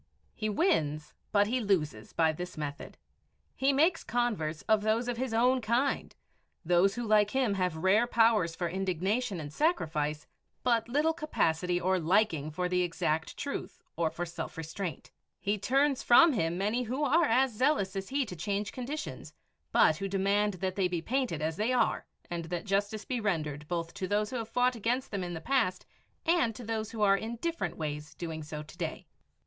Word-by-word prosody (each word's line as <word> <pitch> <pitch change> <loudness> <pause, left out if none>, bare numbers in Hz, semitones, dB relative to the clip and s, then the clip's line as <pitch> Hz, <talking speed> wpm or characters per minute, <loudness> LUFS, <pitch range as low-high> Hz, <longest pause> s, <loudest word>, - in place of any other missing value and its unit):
He 215 -1 -2
wins, 155 - 0 0.2
but 205 -1 +4
he 245 +5 0
loses, 155 - -1
by 160 -1 +3
this 180 +2 -7
method. 145 -2 -6 0.6
He 270 +1 +2
makes 320 +5 +3
converts 215 -11 -1
of 220 -1 +3
those 220 +3 +1
of 245 -1 -2
his 260 0 -2
own 250 +3 +3
kind, 240 +5 0 0.5
those 180 +4 +3
who 240 -1 -3
like 210 -1 +4
him 255 -3 +1
have 180 -4 -1
rare 195 +8 +3
powers 225 -8 +3
for 175 - -2
indignation 190 +4 -1
and 150 -1 -7
sacrifice, 155 - 0 0.4
but 235 -2 +2
little 300 +5 +2
capacity 180 - 0
or 185 +1 +1
liking 165 -3 +2
for 180 +4 -2
the 180 0 +1
exact 160 -2 -1
truth 355 +5 -5
or 165 -2 +1
for 170 +2 -4
self 170 -1 -6
restraint. 165 +2 -5 0.3
He 205 +1 -1
turns 275 +5 +2
from 310 +6 +7
him 170 -6 0
many 210 +6 0
who 255 +5 -2
are 320 +4 +4
as 255 0 +3
zealous 215 -5 +1
as 195 0 -4
he 275 0 0
to 185 - -7
change 200 +5 -2
conditions, 275 +5 -6 0.4
but 155 - +5
who 195 +2 -3
demand 200 +1 +1
that 185 +1 -3
they 190 -2 +2
be 175 -2 -3
painted 240 - -1
as 160 +1 -1
they 220 +4 +1
are 250 - +1 0.2
and 170 -2 -4
that 175 +2 -4
justice 205 +2 -1
be 250 -2 -2
rendered 150 -7 -2
both 170 -1 -3
to 185 - -4
those 210 +2 0
who 255 - -2
have 225 -1 -5
fought 250 +1 +2
against 240 +4 -1
them 200 -3 -2
in 175 -1 -4
the - - -4
past 255 -8 0 0.4
and 330 -10 +2
to 245 - -8
those 220 -1 -3
who 220 -2 -2
are 195 -1 +6
in 225 +4 -4
different 335 +8 -3
ways 150 -1 -5
doing 160 -1 -5
so 150 0 -6
to 155 +3 -15
day. 170 +1 -4
200 Hz, 190 wpm, -30 LUFS, 170-240 Hz, 0.6 s, from